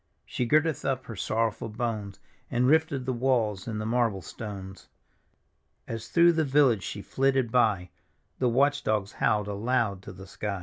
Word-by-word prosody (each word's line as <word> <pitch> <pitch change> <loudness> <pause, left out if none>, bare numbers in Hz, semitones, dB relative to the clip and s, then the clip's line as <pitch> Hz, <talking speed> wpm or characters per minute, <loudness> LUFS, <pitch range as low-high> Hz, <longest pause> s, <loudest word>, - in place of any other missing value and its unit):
She 125 - -2
girded 155 +3 +2
up 130 -1 -1
her 115 - -7
sorrowful 110 +3 -1
bones, 105 -3 -4 0.3
And 120 +1 +1
rifted 145 -2 +2
the 130 - -1
walls 115 -6 0
and 110 -2 -3
the 110 - -3
marble 115 -5 0
stones. 95 -5 -8 1.0
As 115 -1 -5
through 170 0 +5
the 160 -1 +1
village 135 -7 +3
she 100 - -6
flitted 135 -3 +1
by, 105 -8 +2 0.5
The 125 - +2
watch 140 +4 +2
dogs 105 -1 0
howled 105 -2 +1
aloud 105 -1 -1
to - - -9
the 95 +1 -11
sky. 100 0 -4
115 Hz, 165 wpm, -27 LUFS, 105-130 Hz, 1.0 s, through